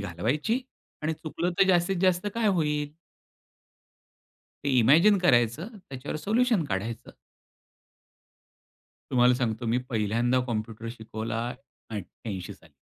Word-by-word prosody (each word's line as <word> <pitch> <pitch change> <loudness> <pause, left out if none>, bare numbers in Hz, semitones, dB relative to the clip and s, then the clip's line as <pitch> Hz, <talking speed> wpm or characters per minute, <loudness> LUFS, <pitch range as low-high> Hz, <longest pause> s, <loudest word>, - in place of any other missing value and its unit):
घालवायची 120 - -1 0.4
आणि 155 +1 0
चुकलं 165 +3 -3
तर 195 - +6
जास्तीत 180 +1 +3
जास्त 185 +1 +2
काय 230 -1 +1
होईल? 150 -5 0 1.7
ते 140 - +1
इमॅजिन 165 - +6
करायचं. 140 - +2 0.2
त्याच्यावर 135 +2 -5
सोल्यूशन 220 +3 +2
काढायचं. 115 0 -4 2.0
तुम्हाला 125 0 +5
सांगतो, 120 -2 -2
मी 115 +2 +2
पहिल्यांदा 115 +3 +1
कॉम्प्युटर 115 -1 -4
शिकवला 110 +1 -4 0.4
88 100 -2 -6
साली. - - -22
130 Hz, 105 wpm, -27 LUFS, 115-175 Hz, 2.0 s, तर